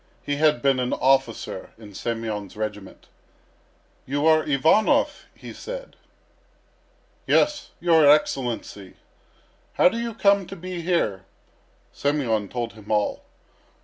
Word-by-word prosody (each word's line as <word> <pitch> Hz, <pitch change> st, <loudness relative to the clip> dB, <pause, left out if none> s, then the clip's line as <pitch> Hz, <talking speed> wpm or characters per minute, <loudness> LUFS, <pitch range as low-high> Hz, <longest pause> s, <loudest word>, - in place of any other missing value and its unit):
He 145 Hz, 0 st, -2 dB
had 150 Hz, -5 st, +2 dB
been 135 Hz, -2 st, +3 dB
an 125 Hz, 0 st, -1 dB
officer 135 Hz, 0 st, 0 dB
in 105 Hz, -2 st, -13 dB
Semyon's 110 Hz, -2 st, -4 dB
regiment. 105 Hz, -2 st, -6 dB, 1.0 s
"You 145 Hz, +3 st, -1 dB
are 155 Hz, -1 st, +5 dB
Ivanov?" 155 Hz, +9 st, +2 dB
he -, -, -10 dB
said. -, -, -8 dB, 1.3 s
"Yes, 300 Hz, 0 st, +2 dB
your 165 Hz, -4 st, +5 dB
Excellency." 120 Hz, -9 st, 0 dB, 0.8 s
"How -, -, +5 dB
do 230 Hz, -, -4 dB
you 235 Hz, -2 st, -4 dB
come 200 Hz, -3 st, +3 dB
to 195 Hz, -, -8 dB
be 180 Hz, -1 st, -6 dB
here?" 135 Hz, -, -1 dB, 0.7 s
Semyon 120 Hz, -9 st, -1 dB
told 120 Hz, -2 st, -4 dB
him 105 Hz, -2 st, -15 dB
all. 105 Hz, -1 st, 0 dB
140 Hz, 115 wpm, -24 LUFS, 110-170 Hz, 1.3 s, are